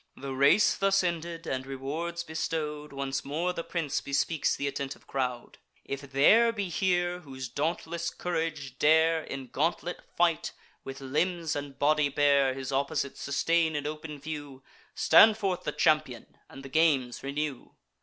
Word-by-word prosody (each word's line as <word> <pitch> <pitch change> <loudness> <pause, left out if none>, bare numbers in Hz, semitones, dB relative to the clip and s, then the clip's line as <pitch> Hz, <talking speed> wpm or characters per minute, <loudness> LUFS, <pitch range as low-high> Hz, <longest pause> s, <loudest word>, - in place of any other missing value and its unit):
The 135 0 -5
race 140 +10 +4
thus 195 -1 +2
ended, 170 -1 -3
and 130 0 -2
rewards 155 +6 -4
bestow'd, 155 -2 -3
Once 140 0 -3
more 165 +6 -1
the 165 - -4
prince 165 -6 -2
bespeaks 140 +2 0
th' - - -12
attentive 140 -1 -4
crowd: 125 -3 -3 0.3
"If 140 0 -6
there 220 +13 +5
be 205 -5 -3
here, 175 0 0
whose 130 -5 -7
dauntless 165 +5 -2
courage 160 -6 -4
dare 160 +1 +4
In 135 -3 -7
gauntlet 170 +6 -1 0.2
fight, 170 -2 +1 0.3
with 135 0 -8
limbs 165 +4 -1
and 145 -1 -6
body 150 0 +3
bare, 140 -2 +3
His 135 0 -5
opposite 140 +1 -1
sustain 160 +3 +1
in 145 -1 -2
open 150 0 -5
view, 145 -2 -7 0.3
Stand 215 +6 +7
forth 195 -4 -2
the - - 0
champion, 155 -7 0
and 135 +1 -11
the 135 - -9
games 135 -5 +2
renew. 140 -1 -4
150 Hz, 150 wpm, -29 LUFS, 140-165 Hz, 0.3 s, Stand